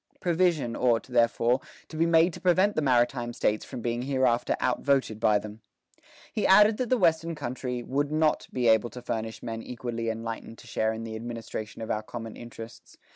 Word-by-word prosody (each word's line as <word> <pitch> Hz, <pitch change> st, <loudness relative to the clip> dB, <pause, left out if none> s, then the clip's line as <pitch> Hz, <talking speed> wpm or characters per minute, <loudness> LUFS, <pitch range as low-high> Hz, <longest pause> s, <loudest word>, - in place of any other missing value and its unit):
Provision 170 Hz, -8 st, +1 dB
ought, 120 Hz, -3 st, +2 dB
therefore, 120 Hz, +1 st, +2 dB, 0.3 s
to -, -, -11 dB
be 165 Hz, +2 st, +2 dB
made 165 Hz, +1 st, +4 dB
to -, -, -9 dB
prevent 185 Hz, +3 st, +3 dB
the -, -, +1 dB
maritime 120 Hz, -2 st, +1 dB
States 105 Hz, -2 st, 0 dB
from 125 Hz, -, -7 dB
being 120 Hz, +1 st, -2 dB
hereafter 130 Hz, -2 st, +1 dB
outvoted 135 Hz, -6 st, +1 dB
by 110 Hz, -2 st, +4 dB
them." 105 Hz, +2 st, -8 dB, 0.7 s
He 215 Hz, -, +1 dB
added 210 Hz, +2 st, +6 dB
that 250 Hz, -3 st, -2 dB
the 255 Hz, -, +3 dB
Western 165 Hz, -4 st, +2 dB
country 125 Hz, -3 st, -4 dB
"would 140 Hz, +4 st, -1 dB
not 155 Hz, 0 st, +1 dB
be 125 Hz, -2 st, 0 dB
able 110 Hz, +1 st, +4 dB
to 125 Hz, -, -9 dB
furnish 110 Hz, -1 st, -4 dB
men 115 Hz, -1 st, -4 dB
equally 115 Hz, -2 st, -4 dB
enlightened 115 Hz, 0 st, -5 dB
to -, -, -15 dB
share 110 Hz, 0 st, 0 dB
in 110 Hz, 0 st, -5 dB
the 110 Hz, -1 st, -6 dB
administration 115 Hz, -1 st, -6 dB
of 110 Hz, -, -4 dB
our 105 Hz, -, -1 dB
common 115 Hz, 0 st, -7 dB
interests. 115 Hz, -1 st, -11 dB
120 Hz, 185 wpm, -27 LUFS, 115-150 Hz, 0.7 s, added